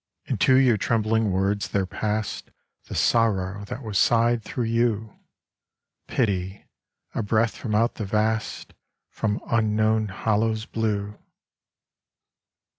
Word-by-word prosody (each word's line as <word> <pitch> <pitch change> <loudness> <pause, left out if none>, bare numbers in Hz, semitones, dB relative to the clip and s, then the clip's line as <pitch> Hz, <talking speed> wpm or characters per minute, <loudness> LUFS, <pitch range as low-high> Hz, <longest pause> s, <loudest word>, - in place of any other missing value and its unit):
Into 130 - +3
your 130 -4 +5
trembling 110 -1 +1
words 100 +2 0
there 100 -1 0
passed 105 +3 -3 0.4
The - - -7
sorrow 100 -3 +1
that 115 +6 -7
was 105 -4 -1
sighed 115 +2 +3
through 120 - -4
you 115 -2 0 0.9
Pity, 95 -5 -1 0.5
a - - -1
breath 110 +1 +1
from 105 -3 -3
out 115 +2 +2
the 110 - -5
vast, 110 +2 -1 0.4
From 105 -1 -1
unknown 110 -1 +2
hollows 110 +3 0
blew. 105 -3 -2
110 Hz, 115 wpm, -25 LUFS, 105-115 Hz, 0.9 s, your